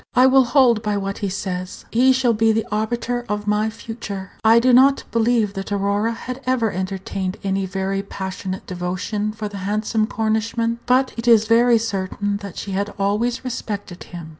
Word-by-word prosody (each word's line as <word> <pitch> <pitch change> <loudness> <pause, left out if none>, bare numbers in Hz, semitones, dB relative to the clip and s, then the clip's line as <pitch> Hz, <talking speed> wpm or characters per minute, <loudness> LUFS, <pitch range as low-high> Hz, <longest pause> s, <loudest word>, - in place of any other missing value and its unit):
"I 255 +1 +6
will 265 0 +5
hold 245 -3 +4
by 210 -2 -1
what 195 0 -3
he 200 - -2
says. 185 -2 -5
He 255 +3 +4
shall 255 -2 +2
be 225 +1 +3
the 220 0 0
arbiter 235 +3 -1
of 210 0 -2
my 210 +1 +1
future." 220 -3 -7
I 225 +1 +6
do 250 +1 +3
not 270 +3 +5
believe 230 -2 +2
that 195 0 -6
Aurora 205 +3 0
had 255 +3 -7
ever 240 -4 +1
entertained 190 0 -4
any 195 0 -1
very 195 +1 -2
passionate 190 -1 -6
devotion 185 +4 -3
for 215 0 -5
the 205 -1 -8
handsome 215 +3 -1
Cornishman, 225 +1 -1
but 255 +1 +3
it 230 +1 -4
is 225 -2 +6
very 235 +1 +5
certain 205 -2 -2
that 200 -3 -9
she 200 - -5
had 200 +2 -2
always 225 +6 0
respected 205 -7 -5
him. 170 -3 -9
215 Hz, 180 wpm, -21 LUFS, 195-230 Hz, -, I